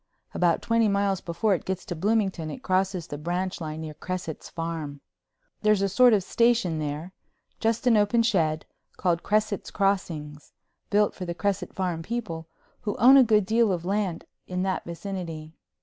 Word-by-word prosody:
About 175 Hz, -2 st, +2 dB
twenty 230 Hz, -1 st, +3 dB
miles 200 Hz, -1 st, +1 dB
before 195 Hz, +5 st, 0 dB
it 180 Hz, -, -1 dB
gets 190 Hz, -1 st, -4 dB
to 175 Hz, -, -4 dB
Bloomington 190 Hz, -3 st, 0 dB
it 250 Hz, -, -8 dB
crosses 185 Hz, -2 st, 0 dB
the 145 Hz, -3 st, -7 dB
branch 180 Hz, +3 st, -2 dB
line 155 Hz, 0 st, -5 dB
near 155 Hz, -1 st, -6 dB
Cresset's 175 Hz, 0 st, -5 dB
Farm. 165 Hz, -4 st, -5 dB, 0.6 s
There's 215 Hz, -2 st, +3 dB
a -, -, +1 dB
little 195 Hz, -1 st, -1 dB
sort 250 Hz, -2 st, +7 dB
of 200 Hz, -3 st, +3 dB
station 230 Hz, -7 st, +2 dB
there—just 175 Hz, -, -4 dB
an 245 Hz, -2 st, +5 dB
open 210 Hz, +3 st, +3 dB
shed—called 170 Hz, -2 st, -1 dB
Cresset's 215 Hz, -1 st, 0 dB
Crossing, 165 Hz, -7 st, -1 dB, 0.5 s
built 210 Hz, 0 st, +3 dB
for 185 Hz, -, -6 dB
the 170 Hz, -1 st, -4 dB
Cresset 200 Hz, +1 st, -2 dB
Farm 180 Hz, -3 st, -1 dB
people, 170 Hz, -5 st, -4 dB, 0.3 s
who 210 Hz, -3 st, -3 dB
own 255 Hz, +4 st, +8 dB
a 270 Hz, -, +9 dB
good 210 Hz, -4 st, +3 dB
deal 225 Hz, +1 st, +3 dB
of 175 Hz, -2 st, -2 dB
land 190 Hz, -3 st, -1 dB, 0.2 s
in 180 Hz, 0 st, -2 dB
that 190 Hz, -1 st, -1 dB
vicinity. 170 Hz, -3 st, -6 dB
185 Hz, 165 wpm, -26 LUFS, 165-210 Hz, 0.6 s, a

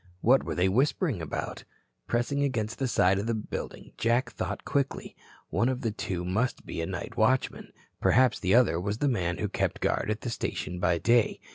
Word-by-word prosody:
What 130 Hz, +4 st, +5 dB
were -, -, -4 dB
they 90 Hz, +1 st, +3 dB
whispering 130 Hz, -, +1 dB
about? 80 Hz, -, -4 dB, 0.4 s
Pressing 120 Hz, +4 st, 0 dB
against 115 Hz, -5 st, -1 dB
the 135 Hz, -, +1 dB
side 95 Hz, -5 st, +3 dB
of 105 Hz, -, -3 dB
the 115 Hz, -, +1 dB
building, 110 Hz, -, -6 dB
Jack 120 Hz, +2 st, +1 dB
thought -, -, -4 dB
quickly. 140 Hz, -2 st, -2 dB, 0.4 s
One 120 Hz, -, +2 dB
of 130 Hz, 0 st, -2 dB
the 115 Hz, -4 st, -1 dB
two 90 Hz, -4 st, -4 dB
must 105 Hz, +8 st, -1 dB
be -, -, -5 dB
the 80 Hz, -, -2 dB
night 90 Hz, -3 st, -5 dB
watchman. 130 Hz, +4 st, +1 dB, 0.3 s
Perhaps 125 Hz, -1 st, +4 dB
the 95 Hz, +3 st, +2 dB
other 120 Hz, -9 st, +4 dB
was 100 Hz, +3 st, -2 dB
the 145 Hz, -, +1 dB
man 85 Hz, -9 st, 0 dB
who -, -, -1 dB
kept -, -, -1 dB
guard -, -, 0 dB
at 110 Hz, 0 st, -2 dB
the 120 Hz, -, -3 dB
station 90 Hz, -5 st, -3 dB
by 90 Hz, -1 st, +2 dB
day. 115 Hz, +5 st, +2 dB
115 Hz, 195 wpm, -28 LUFS, 95-125 Hz, 0.4 s, What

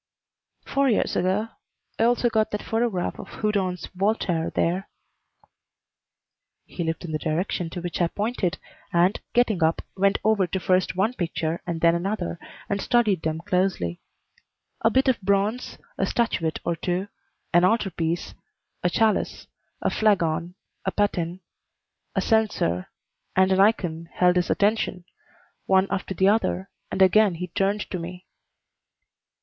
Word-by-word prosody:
"Four 275 Hz, 0 st, +2 dB
years 220 Hz, -, +1 dB
ago. 190 Hz, +5 st, +1 dB, 0.5 s
I 225 Hz, -, +4 dB
also 240 Hz, +1 st, +3 dB
got 220 Hz, -2 st, +1 dB
that 210 Hz, -, -4 dB
photograph 225 Hz, -5 st, -1 dB
of -, -, -8 dB
Houdon's 195 Hz, -4 st, -1 dB
Voltaire 185 Hz, -4 st, 0 dB
there." 180 Hz, +4 st, -1 dB, 1.8 s
He 175 Hz, -, -5 dB
looked 165 Hz, +2 st, -3 dB
in 165 Hz, -, -5 dB
the 155 Hz, -, -1 dB
direction 165 Hz, +2 st, -1 dB
to 175 Hz, -, -6 dB
which 175 Hz, 0 st, -3 dB
I 170 Hz, -, +4 dB
pointed, 205 Hz, -1 st, -1 dB, 0.3 s
and, 175 Hz, +4 st, +3 dB
getting 225 Hz, -7 st, +2 dB
up, 160 Hz, +1 st, +2 dB
went 195 Hz, +1 st, +3 dB
over 210 Hz, -4 st, +3 dB
to 190 Hz, -, -2 dB
first 185 Hz, 0 st, +1 dB
one 205 Hz, +6 st, +1 dB
picture 170 Hz, -5 st, -2 dB
and 165 Hz, -2 st, -3 dB
then 170 Hz, 0 st, +5 dB
another, 175 Hz, -1 st, -2 dB, 0.3 s
and 200 Hz, -1 st, -1 dB
studied 215 Hz, -8 st, +2 dB
them 160 Hz, 0 st, -2 dB
closely. 180 Hz, -, 0 dB, 0.8 s
A 225 Hz, -, +4 dB
bit 265 Hz, +4 st, +2 dB
of 255 Hz, -5 st, +2 dB
bronze, 200 Hz, +5 st, 0 dB, 0.2 s
a -, -, +2 dB
statuette 175 Hz, -9 st, 0 dB
or 170 Hz, -, 0 dB
two, 180 Hz, +4 st, -2 dB, 0.5 s
an 175 Hz, +1 st, +5 dB
altar 200 Hz, +1 st, +2 dB
piece, 165 Hz, +1 st, -2 dB, 0.5 s
a 180 Hz, -, +2 dB
chalice, 215 Hz, +3 st, +1 dB, 0.4 s
a -, -, +2 dB
flagon, 175 Hz, -5 st, +1 dB, 0.3 s
a 190 Hz, -, -1 dB
paten, 185 Hz, -3 st, -1 dB, 0.7 s
a -, -, +2 dB
censer, 210 Hz, -, +1 dB, 0.5 s
and 190 Hz, 0 st, +4 dB
an 190 Hz, -, +3 dB
ikon 175 Hz, -6 st, +2 dB
held 180 Hz, 0 st, +3 dB
his 180 Hz, -, +1 dB
attention, 200 Hz, -4 st, +1 dB, 0.6 s
one 190 Hz, 0 st, +4 dB
after 195 Hz, -1 st, -2 dB
the 190 Hz, +3 st, +3 dB
other, 200 Hz, -2 st, +1 dB, 0.2 s
and 190 Hz, -, +3 dB
again 200 Hz, 0 st, +5 dB
he 180 Hz, +2 st, -5 dB
turned 200 Hz, +4 st, 0 dB
to 185 Hz, -, -2 dB
me. 180 Hz, +2 st, -8 dB
190 Hz, 145 wpm, -25 LUFS, 170-210 Hz, 1.8 s, then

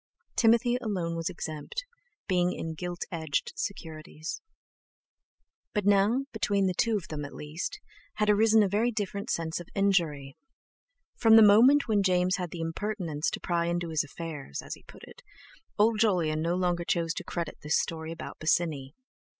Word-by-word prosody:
Timothy 235 Hz, +1 st, +4 dB
alone 185 Hz, -8 st, -2 dB
was 165 Hz, +1 st, -2 dB
exempt, 165 Hz, -, -5 dB, 0.4 s
being 180 Hz, -2 st, +2 dB
in 160 Hz, 0 st, -4 dB
gilt 175 Hz, +2 st, -5 dB
edged 160 Hz, -4 st, -2 dB
securities. 160 Hz, -4 st, -6 dB, 1.3 s
But 210 Hz, -2 st, 0 dB
now, 205 Hz, +6 st, +3 dB
between 200 Hz, -3 st, +1 dB
two 230 Hz, +1 st, +2 dB
of 185 Hz, -, -8 dB
them 150 Hz, -2 st, -4 dB
at 145 Hz, -, -8 dB
least, 160 Hz, -, -5 dB, 0.4 s
had 210 Hz, -, +1 dB
arisen 215 Hz, +1 st, +5 dB
a -, -, +2 dB
very 210 Hz, +5 st, +1 dB
different 205 Hz, -2 st, -4 dB
sense 165 Hz, 0 st, -1 dB
of 175 Hz, -, -10 dB
injury. 165 Hz, -9 st, +1 dB, 0.8 s
From 225 Hz, -1 st, +6 dB
the 225 Hz, -, +9 dB
moment 240 Hz, +8 st, +6 dB
when 210 Hz, -3 st, +3 dB
James 185 Hz, -1 st, +2 dB
had 180 Hz, -2 st, -3 dB
the 165 Hz, +1 st, -6 dB
impertinence 165 Hz, -2 st, -2 dB
to -, -, -5 dB
pry 170 Hz, -1 st, 0 dB
into 175 Hz, 0 st, -1 dB
his 160 Hz, -2 st, +1 dB
affairs—as 145 Hz, -, -7 dB
he -, -, -11 dB
put -, -, -14 dB
it—old 215 Hz, +1 st, -3 dB
Jolyon 170 Hz, -8 st, +2 dB
no 170 Hz, +2 st, 0 dB
longer 175 Hz, -1 st, 0 dB
chose 170 Hz, -1 st, 0 dB
to -, -, -5 dB
credit 170 Hz, -3 st, -5 dB
this 150 Hz, +1 st, +1 dB
story 160 Hz, -1 st, -4 dB
about 165 Hz, -, -8 dB
Bosinney. 155 Hz, -4 st, 0 dB
175 Hz, 160 wpm, -28 LUFS, 160-210 Hz, 1.3 s, the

